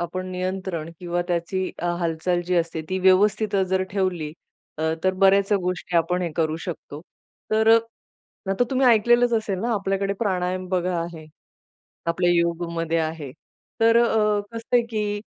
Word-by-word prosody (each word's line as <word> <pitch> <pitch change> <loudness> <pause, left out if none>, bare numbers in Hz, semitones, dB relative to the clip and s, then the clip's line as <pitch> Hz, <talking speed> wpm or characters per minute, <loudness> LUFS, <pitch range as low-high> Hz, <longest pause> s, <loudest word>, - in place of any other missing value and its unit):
आपण 185 +2 -4
नियंत्रण 185 -3 -3
किंवा 175 0 -2
त्याची 175 +2 -1 0.3
हालचाल 170 +1 0
जी 180 - 0
असते 165 -1 0
ती 190 0 -1
व्यवस्थित 200 +3 +3
जर 190 0 +2
ठेवली. 185 -6 -1 0.5
अ, - - -2 0.2
तर 185 0 +2
बऱ्याचशा 195 +1 +5
गोष्टी 180 -1 -2
आपण 180 +2 +1
हे 170 - -2
करू 160 -1 0
शकतो. 155 -4 -7 0.5
तर 220 +1 +3 0.8
नाहीतर 195 +6 +1
तुम्ही 265 -1 +2
ऐकलेलंच 240 +1 +4
असेल 215 -4 -1
ना 235 +1 -1
आपल्याकडे 195 -1 -1
प्राणायाम 185 -2 -1
बघा 180 -1 0
आहे. 165 -2 -7 0.8
आपल्या 175 +1 +1
योगमध्ये 170 -1 0
आहे. 155 -4 -4 0.5
तर 230 +1 +5
अ, 210 -2 +2
कसं 230 +1 -3
आहे, 240 - +6
की 210 -2 -2
185 Hz, 145 wpm, -23 LUFS, 170-205 Hz, 0.8 s, आहे